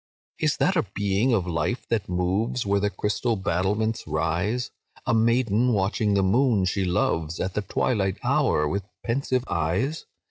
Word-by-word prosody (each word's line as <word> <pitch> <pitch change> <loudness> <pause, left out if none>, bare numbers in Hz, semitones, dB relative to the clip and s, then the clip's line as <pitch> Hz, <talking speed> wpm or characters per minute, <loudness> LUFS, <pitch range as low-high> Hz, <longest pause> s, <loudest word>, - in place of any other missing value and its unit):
"Is 155 -2 +1
that 190 - +2
a 160 - +1
being 100 +5 +1
of 100 -7 +2
life, 85 +8 -2
that 110 -6 -1
moves 95 +7 0
Where 100 0 +2
the 105 +1 +1
crystal 105 +3 -1
battlements 100 +4 -1
rise? 90 +10 -1 0.3
A - - +1
maiden, 115 +1 +2
watching 100 +1 +1
the 100 - +3
moon 110 0 +3
she 95 +1 0
loves, 85 -2 0
At 95 0 -2
the 105 - -1
twilight 100 -1 0
hour, 75 0 +2
with 100 +6 -1 0.2
pensive 130 +1 0
eyes? 90 - -1
100 Hz, 155 wpm, -25 LUFS, 95-115 Hz, 0.3 s, the